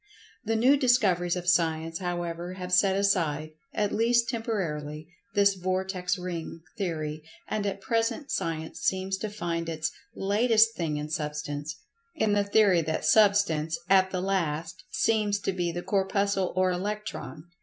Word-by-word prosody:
The 225 +1 0
new 255 +6 +5
discoveries 200 - +2
of 180 -1 -5
Science, 165 -2 +1
however, 175 -1 -3
have 180 -1 -6
set 190 +1 +4
aside 165 -6 +1 0.2
(at 210 -2 0
least 235 +2 +2
temporarily) 160 - -3 0.3
this 200 -1 +5
"vortex 185 0 -1
ring" 170 -2 -5
theory, 155 -6 -3 0.3
and 210 -1 -1
at 195 0 -3
present 230 +6 -1
Science 160 -1 -3
seems 190 0 0
to 215 - -3
find 170 -5 -3
its 160 -1 -2 0.2
"latest 225 +3 +3
thing 160 -6 -2
in 150 +1 -4
Substance," 150 -1 -4 0.4
in 215 -1 +1
the 205 0 +3
theory 200 -3 +4
that 160 0 -2
Substance—at 190 -3 +3
the 185 -1 -2
last—seems 190 +4 0
to 195 - -2
be 175 -2 -1
the 175 +1 -5
Corpuscle 195 -1 0
or 185 0 +3
Electron. 205 -4 -4
185 Hz, 140 wpm, -27 LUFS, 165-205 Hz, 0.4 s, new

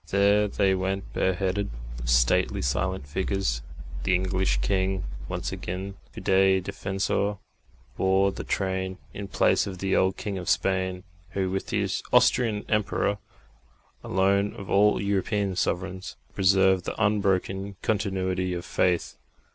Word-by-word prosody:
There 100 +1 +4
they 100 -1 +2
went 95 +1 -2
bareheaded, 95 +2 0 0.3
the - - -6
stately - - +3
silent 65 +1 -1
figures. 90 -4 -1 0.4
The 95 - +2
English 95 -6 +1
king, 95 +6 0 0.3
once - - -3
again 95 +2 -5 0.2
Fidei 95 0 +3
Defensor, 95 +2 -1 0.6
bore 95 +1 +3
the - - -6
train 95 -1 -2 0.2
in 100 -1 -6
place - - +2
of 95 -2 -6
the 95 +1 0
old 95 0 +2
king 100 -3 -4
of 90 - -4
Spain, 95 +1 0 0.3
who, 95 -1 -1
with 95 0 -2
the - - 0 0.2
Austrian 110 -4 +3
Emperor, 105 -1 0 0.8
alone 100 +2 +1
of 100 - -8
all 105 +1 +4
European 100 0 0
sovereigns, 95 0 -2
had - - -33
preserved 95 -1 +3
the - - -4
unbroken 100 -2 +1
continuity 95 -3 0
of 85 - -5
faith. 90 -2 0
95 Hz, 130 wpm, -26 LUFS, 95-100 Hz, 0.8 s, There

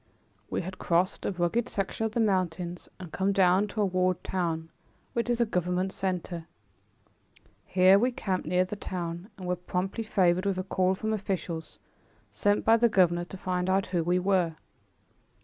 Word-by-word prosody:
We - - -1
had 185 +2 -7
crossed 175 +2 +1
a - - 0
rugged 190 +7 0
section 205 +3 -1
of 215 - -9
the 235 - 0
mountains 180 -4 -1
and 180 -4 -9
come 190 +1 +1
down 190 +1 +4
to 215 +1 -3
a - - +4
walled 185 -1 0
town, 165 -3 -2 0.4
which 235 0 -1
is 240 0 +1
a 235 - +4
government 180 -1 -1
center. 180 -3 -3 1.2
Here 190 +1 +6
we 250 +4 +2
camped 190 -8 -2
near 180 +2 +2
the 195 - -5
town 175 -1 -5
and 185 - -8
were 180 - +1
promptly 180 +4 -3
favored 185 -3 +2
with 195 -2 0
a 185 - -1
call 185 0 +1
from 220 +3 -2
officials, 185 -6 -4 0.5
sent 205 - +1
by 225 +1 +6
the 235 +1 +4
governor 175 -4 +3
to 190 - -9
find 180 0 -1
out 190 +1 +2
who 170 -2 +2
we 175 +2 +2
were. 180 -3 +1
185 Hz, 180 wpm, -28 LUFS, 175-200 Hz, 1.2 s, Here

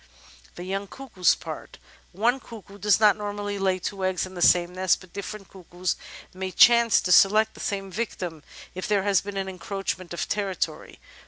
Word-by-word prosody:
The 175 - -7
Young 195 +2 -3
Cuckoo's 220 -7 +1
Part - - -9 0.3
One 235 +8 +1
cuckoo 210 -5 -12
does 210 0 +3
not 210 -2 +5
normally 205 -1 -4
lay 190 -1 +1
two 190 +1 -5
eggs 185 -1 0
in 185 - -11
the 175 - -7
same 175 0 +4
nest, 185 -1 +2
but 185 -2 -17
different 200 0 -7
cuckoos 180 -1 -4 0.4
may 190 0 -4
chance 235 +3 +6
to 180 - -2
select 215 +4 +5
the - - -15
same 195 -1 -3
victim 180 -6 -4 0.3
if 185 - -5
there 205 -2 +1
has 200 -2 +3
been 200 0 -7
an 195 0 -2
encroachment 190 -1 -5
of 175 - -3
territory. 195 -4 -3
195 Hz, 180 wpm, -25 LUFS, 185-205 Hz, 0.4 s, chance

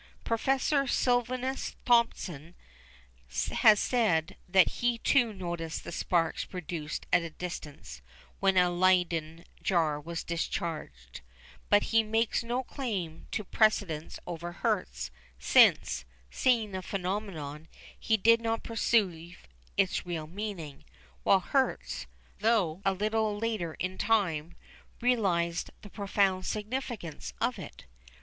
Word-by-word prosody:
Professor 270 +4 +1
Silvanus 250 +2 0
Thomson 180 - +1 1.0
has 215 -2 +6
said 200 -11 +1
that 185 -1 +6
he 240 -1 +2
too 240 -1 +3
noticed 170 -4 -4
the - - -7
sparks 165 -2 0
produced 165 -4 -5
at 180 - +6
a 165 - -5
distance 145 - -7 0.4
when 195 -1 +3
a 180 -1 +5
Leyden 175 -2 +1 0.2
jar 160 -5 +1
was 165 +2 -5
discharged, 155 - -4 0.5
but 205 0 +5
he 225 - +6
makes 225 +1 0
no 240 +3 -1
claim 200 - -4
to 215 - -2
precedence 195 -7 +1
over 175 0 -5
Hertz, - - -2 0.3
since, 65 -1 +4 0.3
seeing 230 -5 +2
the 190 -1 -4
phenomenon, 180 -6 -4 0.3
he 220 - +2
did 230 +3 +5
not 225 0 -1
perceive 185 -7 0 0.3
its 195 -2 +2
real 170 -3 -4
meaning, 175 -5 -6 0.4
while 195 - +4
Hertz, 265 +7 -1 0.3
though 200 -6 +2
a 195 - +2
little 215 +1 0
later 210 -7 -2
in 185 +1 -4
time, 170 -7 +1 0.4
realised 185 -9 +1
the 205 - -11
profound 195 -2 +1
significance 215 - -4
of - - 0
it. - - -10
185 Hz, 115 wpm, -30 LUFS, 165-225 Hz, 1.0 s, has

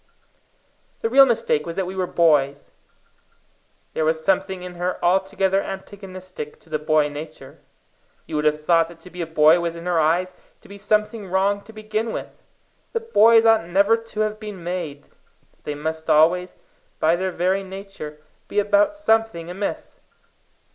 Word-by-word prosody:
The 225 - -1
real 270 +1 +8
mistake 220 - +1
was 165 - -5
that 190 - -1
we 185 +1 -6
were 185 -1 -1
boys. 145 -5 +2 1.2
There 160 - -1
was 160 0 0
something 190 -1 0
in 180 0 -7
her 180 +1 -2
altogether 190 +1 +2
antagonistic 185 -5 -8
to 165 - -21
the 155 - 0
boy 155 0 +2
nature. 145 -2 -9 0.7
You 160 - -6
would 150 0 0
have 150 0 +1
thought 165 -1 +4
that 170 0 -14
to 180 - -13
be 180 - -6
a 165 - -3
boy 160 +1 +5
was 170 -1 -2
in 170 +1 -9
her 175 -2 +1
eyes 175 +4 +1 0.3
to - - -17
be 200 0 -11
something 210 +1 0
wrong 195 +2 +1
to 220 - -12
begin 215 +1 -3
with; - - -7 0.5
that 460 0 -5
boys 225 +1 +6
ought 225 -6 +4
never 200 +5 +4
to 225 -1 -5
have 215 0 -1
been 210 -5 -8
made; 170 -5 -4 0.5
that - - -36
they 150 - -3
must 160 +2 -5
always, 175 +4 +3 0.4
by 160 +2 +3
their 185 +2 -2
very 185 +2 0
nature, 190 -6 -9 0.3
be - - -7
about 205 +8 +3
something 225 - 0
amiss. 195 +3 -5
185 Hz, 170 wpm, -22 LUFS, 160-205 Hz, 1.2 s, real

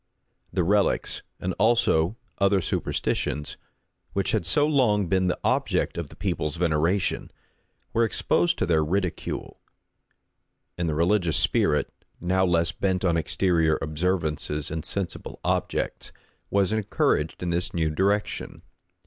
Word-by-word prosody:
The 90 - +1
relics 100 +3 +1 0.4
also 110 -8 +4
and 105 - -9 0.2
other 100 0 +4
superstitions, 75 -3 -2 0.6
which - - 0
had 85 - 0
so 90 +11 +3
long 120 -9 +3
been 95 +1 +1
the 90 - -1
object - - +1
of - - -4
the - - -14
people's 75 -1 -2
veneration, 85 +3 0 0.6
were 115 +1 +3
exposed 175 +8 +1
to - - +1
their 80 -2 +2
ridicule; 90 +1 -3 1.2
and 85 -1 -1
the 75 - -1
religious 85 0 +2
spirit, 75 - +2 0.3
now 95 +2 +1
less 85 -1 +2
bent 95 -1 -1
on 85 -2 +3
exterior 80 -1 +2
observances 75 -2 -1
and 80 -1 -4
sensible 95 -4 -4
objects, - - -1 0.4
was 100 +1 +2
encouraged 95 -7 0
in 90 - -1
this 85 +1 -1
new 80 -2 0
direction. 100 +6 -1
90 Hz, 130 wpm, -26 LUFS, 80-100 Hz, 1.2 s, also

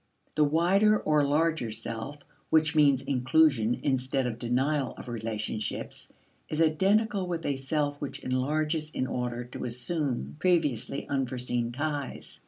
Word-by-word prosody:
The 155 - +3
wider 185 +8 +4
or 150 -1 +2
larger 155 -3 +1
self 115 +5 -5 0.3
which 160 0 +4
means 140 -4 +4
inclusion 130 -3 +2
instead 130 -1 0
of 120 -2 -3
denial 130 +4 0
of - - -9
relationships 110 -2 -4 0.4
is 155 - -3
identical 195 +5 +2
with 170 -2 -3
a 140 - 0
self 145 +2 -2
which 145 - -4
enlarges 150 +4 0
in 130 - -2
order 125 -1 -3
to 120 - -8
assume 125 - -2
previously 150 -8 +1
unforeseen 125 -3 -1
ties. 145 +1 -4
140 Hz, 130 wpm, -28 LUFS, 125-155 Hz, 0.4 s, wider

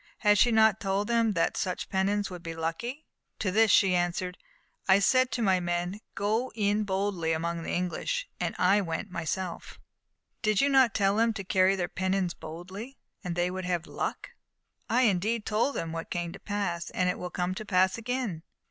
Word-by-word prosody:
Had 210 -2 +4
she 240 - +5
not 220 -3 +4
told 195 +1 -1
them 230 -2 +2
that 165 - +1
such 180 -2 -2
pennons 200 +1 0
would 180 -1 -7
be 165 -1 -6
lucky? 235 - -4 0.3
To 190 - -1
this 220 +3 +4
she 195 -2 +5
answered: 175 +1 -1 0.5
"I 190 0 +7
said 255 +6 +3
to 240 - -1
my 190 -3 +3
men 175 +2 -2 0.2
'Go 220 +5 0
in 210 0 +1
boldly 190 -4 -1
among 170 +1 -2
the - - -6
English!' 485 - -2
and - - -2
I 195 +3 +4
went 165 -1 -4
myself." 170 +1 -4 0.6
"Did 215 -2 +2
you 280 - +4
not 265 -4 +4
tell 200 0 +2
them 230 0 +3
to 200 - -5
carry 190 +1 +3
their 180 -2 -1
pennons 185 -1 -1
boldly, 190 +11 -9 0.3
and 175 -2 -3
they 175 +1 0
would 185 0 -4
have 175 -2 -1
good - - -14
luck?" - - -4 0.6
"I 245 +3 +3
indeed 215 +1 +1
told 230 +6 +1
them 165 - -3
what 165 0 -5
came 175 -1 -3
to - - -10
pass, 200 -5 -3
and 180 0 0
will 180 - -4
come 180 +1 -2
to 200 - -6
pass 185 -2 +2
again." 235 -8 -3
190 Hz, 190 wpm, -28 LUFS, 175-215 Hz, 0.6 s, I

